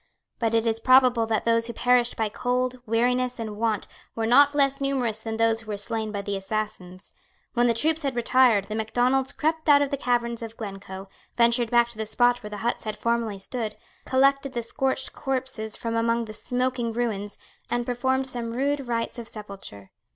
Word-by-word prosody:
But 230 -1 +1
it 225 0 +2
is 225 -1 0
probable 255 -2 +5
that 220 -1 0
those 230 0 +2
who 235 - -5
perished 245 0 +2
by 220 - +1
cold, 250 +3 -1
weariness 250 +2 +1
and 220 -3 -5
want 220 -1 -1 0.3
were 225 - -1
not 285 +5 +5
less 275 -1 +2
numerous 250 -6 -1
than 220 0 -4
those 225 0 +2
who 225 - -17
were 210 -1 -3
slain 215 +1 -3
by 200 -1 -4
the 200 0 -3
assassins. 195 -2 -5 0.4
When 240 0 +3
the 230 - +2
troops 315 +6 +2
had 275 -4 -2
retired, 240 -3 +4
the 215 - -6
Macdonalds 245 +4 +1
crept 315 0 -1
out 285 0 +7
of 280 - -3
the 280 - 0
caverns 240 -2 0
of 230 0 -8
Glencoe, 195 -2 -7 0.3
ventured 235 0 +3
back 235 0 +4
to 230 -2 -12
the 220 - -3
spot 245 +2 +2
where 210 - -7
the 210 - -6
huts 240 - -1
had 215 -1 -4
formerly 230 -2 -1
stood, 215 +2 -4 0.3
collected 275 +1 +2
the 235 - -2
scorched 265 +3 -1
corpses 255 -5 -3
from 230 -1 -3
among 230 0 +1
the 215 - -9
smoking 250 +1 -1
ruins, 220 -3 -3 0.3
and 240 0 -1
performed 260 +2 0
some 240 -3 -2
rude 280 +4 0
rites 230 0 -2
of 230 - -7
sepulture. 195 - -10
235 Hz, 195 wpm, -25 LUFS, 220-255 Hz, 0.4 s, out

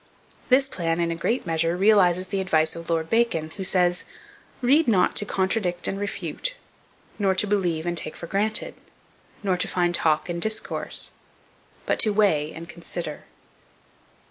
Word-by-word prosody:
This 265 +1 +5
plan, 165 -8 -1
in 170 -1 0
a - - -2
great 230 +9 -1
measure, 165 +1 +1
realizes 185 -3 +4
the 195 0 -1
advice 160 -4 +2
of 170 0 -8
Lord 165 -1 0
Bacon, 165 -8 +1
who 190 - -6
says, 180 -1 +2 0.6
"Read 275 +5 +3
not 195 -6 +3
to 205 - +2
contradict 190 -3 0
and 195 - -2
refute, 205 - -4 0.6
nor 195 -2 +2
to 190 - +1
believe 180 -6 0
and 175 0 -1
take 155 - -3
for - - -7
granted, 210 +5 -1 0.7
nor 190 -2 +1
to - - -1
find 175 -1 +1
talk 160 -2 +2
and 170 -1 -4
discourse, 220 +2 -1 0.7
but - - 0
to 215 -3 +3
weigh 160 -8 +2
and 165 +1 -9
consider." 170 -2 -6
180 Hz, 160 wpm, -24 LUFS, 170-205 Hz, 0.7 s, This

